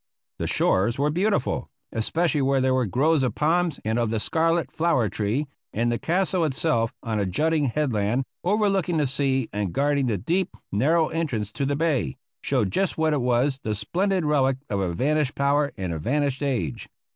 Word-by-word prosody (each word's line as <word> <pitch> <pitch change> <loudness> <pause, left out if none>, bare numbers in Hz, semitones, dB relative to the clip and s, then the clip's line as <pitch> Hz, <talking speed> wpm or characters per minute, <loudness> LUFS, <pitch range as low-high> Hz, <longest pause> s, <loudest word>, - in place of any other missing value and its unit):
The - - -1
shores 100 +6 +1
were 145 +2 +1
beautiful, 195 0 0 0.2
especially 155 +7 0
where 135 0 +2
there 130 0 +2
were 130 -3 +1
groves 145 - +2
of 130 - -1
palms 165 0 +1
and 110 +2 0
of 115 -2 +1
the 110 0 -1
scarlet 165 +2 +1
flower 160 -10 +1
tree, 110 +9 -1 0.3
and 120 +2 +1
the 120 - -1
castle 180 +1 +1
itself, 135 -6 +1
on 110 -2 -1
a 100 - +1
jutting 155 - +1
headland, 125 -3 0 0.2
overlooking 195 -3 +1
the 150 - +2
sea 135 -2 0
and 105 -3 -2
guarding 140 -1 +1
the 110 -4 0
deep, 180 - -1
narrow 155 +10 +2
entrance 125 -11 -2
to 135 +4 -2
the 145 - 0
bay, 140 - 0 0.2
showed 120 -9 0
just 195 - 0
what 160 -1 +2
it 145 - 0
was, 125 +3 +1
the 110 -1 -2
splendid 180 - 0
relic 135 -3 +2
of 100 - 0
a 95 -3 -1
vanished 145 - 0
power 140 +1 +2
and 95 -3 -3
a 80 - -4
vanished 140 - 0
age. 115 - -2
140 Hz, 185 wpm, -25 LUFS, 115-160 Hz, 0.3 s, where